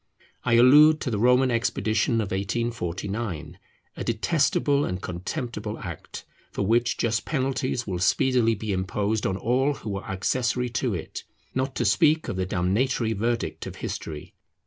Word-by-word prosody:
I 120 - +1
allude 150 +6 +7
to 130 - -2
the 105 - -1
Roman 125 +2 +4
expedition 115 -1 0
of 100 - -4
1849; 95 -4 -3 0.4
a - - -5
detestable 140 +4 +1
and 90 -6 -2
contemptible 95 +8 -5
act, - - -8 0.3
for 100 - -2
which 120 +3 +2
just 115 -1 0
penalties 130 -3 -1
will 90 -3 -3
speedily 115 +5 +3
be 105 0 -3
imposed 100 +3 -1
on 95 - -1
all 130 +7 +1
who 110 - -6
were 100 -1 -4
accessory 120 +6 -1
to 115 -2 -1
it; 80 - -6 0.3
not 130 +1 -2
to - - 0
speak 160 -1 +3
of - - -3
the 95 0 -2
damnatory 110 +6 0
verdict 115 +3 -2
of - - -7
history. 75 -2 -6
115 Hz, 150 wpm, -25 LUFS, 95-130 Hz, 0.4 s, allude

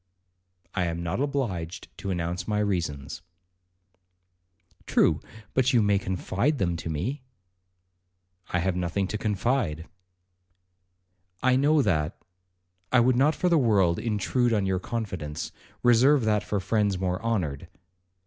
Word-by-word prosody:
'I 90 -3 0
am 85 0 -3
not 85 +6 -2
obliged 105 - -3
to 100 0 -4
announce 90 0 -2
my 105 - 0
reasons.' 85 -9 -2 1.7
'True, - - +3 0.3
but 130 0 +2
you 115 -3 +5
may 100 -1 +3
confide 100 - -1
them 85 -6 0
to 80 - -5
me.' 125 - -3 1.3
'I 90 - 0
have 95 0 0
nothing 90 +2 -1
to 105 - -3
confide.' 105 - 0 1.6
'I 130 0 +4
know 145 +2 +4
that,—I 90 +3 -3
would 125 +1 +4
not 145 +5 +3
for 180 - 0
the 170 -3 +4
world 100 -9 +3
intrude 115 +2 0
on 105 -3 +1
your 95 -1 0
confidence; 95 -10 -4 0.3
reserve 125 +2 +5
that 105 -1 +2
for 105 - -1
friends 100 0 +1
more 90 +1 -2
honoured.' 90 -12 -2
100 Hz, 130 wpm, -27 LUFS, 90-120 Hz, 1.7 s, you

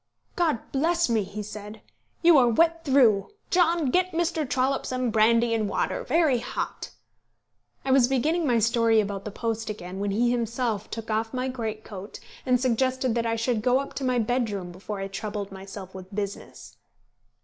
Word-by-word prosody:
"God 320 -10 0
bless 335 +3 +1
me!" 225 -2 +2
he 205 +2 -6
said, 210 +1 -9 0.4
"you 340 -1 +7
are 245 - +5
wet 330 +7 +2
through. 250 -9 +4 0.2
John, 340 -5 +3
get 365 +2 +1
Mr. 325 -4 -1
Trollope 265 +1 +1
some 255 -2 -1
brandy 230 +2 +3
and 215 -3 0
water, - - -1
very 310 -7 +2
hot." 240 - -4 1.0
I 270 - +1
was 260 -2 +5
beginning 300 +6 +1
my 240 -2 +3
story 230 0 +3
about 200 -2 -2
the - - -3
post 225 +1 -3
again 190 -3 -6
when 205 0 -1
he 235 +5 +2
himself 235 -2 -1
took 225 -1 -5
off 225 +3 -1
my 255 +1 -1
greatcoat, 215 -5 -6 0.3
and 250 -1 +4
suggested 255 0 +1
that 230 0 0
I 230 - 0
should 230 -1 0
go 250 +3 +3
up 275 +1 -4
to 275 - -5
my 255 -1 +1
bedroom 220 -6 -1
before 195 +3 -6
I 195 - -3
troubled 205 0 -5
myself 195 0 -9
with 190 +1 -10
business. 200 -1 -6
230 Hz, 175 wpm, -26 LUFS, 210-260 Hz, 1.0 s, you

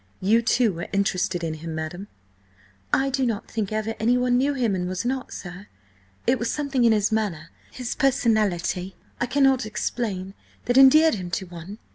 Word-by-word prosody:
"You, 220 +5 +3
too, 235 -2 +2
were 170 +1 -6
interested 190 -3 0
in 160 -1 -2
him, 160 +1 -6
madam?" 170 +5 -5 0.8
"I 270 0 +2
do 265 0 0
not 225 -5 -2
think 215 -3 -2
ever 215 +1 -2
anyone 245 +2 +2
knew 275 +3 +1
him 235 -6 +1
and 180 -1 -2
was 185 +4 -3
not, 260 +1 -2
sir. 180 +2 -9 0.6
It 250 +2 +2
was 230 - -1
something 280 -4 -1
in 230 - +5
his 210 0 +2
manner, 195 -8 -2 0.2
his 250 -2 -5
personality–I 215 - 0
cannot 270 0 +3
explain–that 210 +1 -4
endeared 305 +4 +7
him 185 -4 -4
to 180 +2 -3
one. 175 +3 -9
220 Hz, 165 wpm, -24 LUFS, 185-250 Hz, 0.8 s, endeared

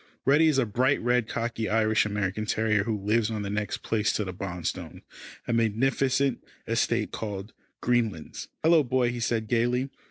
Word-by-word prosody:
Reddy 150 +4 +5
is 150 -3 +3
a 130 - +3
bright 130 +6 +1
red, 120 -1 +1
cocky 115 -1 -2
Irish 110 -1 +2
American 105 0 -2
terrier 110 -2 +1
who 110 -2 -1
lives 105 +2 +1
on 110 -2 -3
the 100 - -4
next 105 0 -3
place 105 -1 +1
to 105 - 0
the 95 -2 -5
Bonstones 90 -2 -5 0.4
a 120 - 0
magnificent 130 +4 +1 0.2
estate 115 -1 0
called 105 -1 -5 0.3
Greenlands. 115 -10 -1 0.2
"Hello! 165 0 +6
Boy," 125 -1 +1
he 120 - -5
said 115 -1 -1
gaily. 125 +4 +1
115 Hz, 165 wpm, -27 LUFS, 105-125 Hz, 0.4 s, Hello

